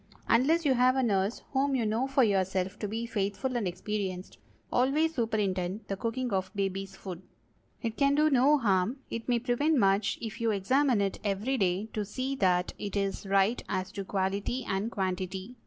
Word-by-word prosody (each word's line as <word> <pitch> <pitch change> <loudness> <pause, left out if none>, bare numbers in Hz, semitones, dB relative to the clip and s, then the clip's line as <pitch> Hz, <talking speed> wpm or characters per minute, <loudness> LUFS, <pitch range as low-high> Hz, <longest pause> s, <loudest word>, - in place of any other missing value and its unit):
Unless 305 +8 +3
you 275 - +4
have 255 +1 +4
a 265 - +2
nurse 200 -1 0
whom 275 0 +1
you 240 -3 +1
know 225 +5 0
for 270 -1 +3
yourself 190 -1 0
to 210 - -2
be 225 +3 -3
faithful 230 +4 -2
and 225 -5 0
experienced, 185 0 -4 0.3
always 295 +6 +2
superintend 205 - -1
the 195 - -1
cooking 230 +3 -2
of 190 0 0
baby's 195 0 -2
food. 185 -3 -7 0.6
It 225 -1 -3
can 280 0 +3
do 305 +1 +3
no 275 +3 +5
harm—it 230 +2 -1
may 240 - +3
prevent 255 +6 +1
much—if 205 +1 +1
you 230 - +2
examine 235 +4 +2
it 195 -1 -1
every 215 +6 -1
day 185 +2 +1
to 210 - -1
see 255 +6 -3
that 180 -5 +2
it 205 -1 -5
is 195 0 -2
right 195 +4 +2
as 185 0 -2
to 200 -1 -5
quality 195 +6 -2
and 195 +4 -1
quantity. 190 +2 -3
215 Hz, 175 wpm, -29 LUFS, 195-255 Hz, 0.6 s, no